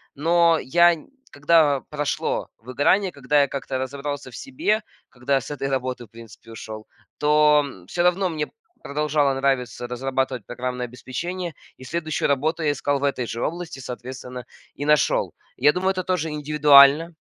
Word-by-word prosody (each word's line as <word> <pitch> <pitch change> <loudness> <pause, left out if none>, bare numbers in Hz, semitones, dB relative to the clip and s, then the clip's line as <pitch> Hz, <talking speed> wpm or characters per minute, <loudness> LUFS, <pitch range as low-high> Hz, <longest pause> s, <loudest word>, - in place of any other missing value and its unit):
но 165 +2 +3
я 170 +5 +4
н 160 - -10 0.2
когда 145 -2 +3
прошло 150 -2 -2
выгорание, 145 - +1
когда 145 0 +1
я 140 - +2
как-то 135 -1 -4
разобрался 140 0 -5
в - - -11
себе, 260 -6 -1 0.3
когда 135 +2 0
с 135 - -9
этой 135 -1 -3
работы 130 -2 -3
в - - -22
принципе 115 0 -14
ушел, 110 -1 -9 0.3
то 150 0 +4 0.2
всё 175 +7 -1
равно 180 +1 +2
мне 155 -2 -3 0.3
продолжало 145 -1 0
нравиться 130 -3 -1
разрабатывать 130 -1 -2
программное 125 0 -4
обеспечение 170 +8 -5 0.2
и 130 - -14
следующую 155 +1 -2
работу 155 +4 0
я 150 - +2
искал 145 0 -1
в - - -6
этой 130 -4 -1
же 115 - -5
области, 170 -4 -5
соответственно, 125 0 -8 0.3
и 145 - -6
нашел. 150 0 +2 0.2
Я 145 +4 +4
думаю, 190 +1 +1
это 185 -1 -3
тоже 175 -4 -1
индивидуально. 150 +1 +5
145 Hz, 155 wpm, -23 LUFS, 130-160 Hz, 0.3 s, индивидуально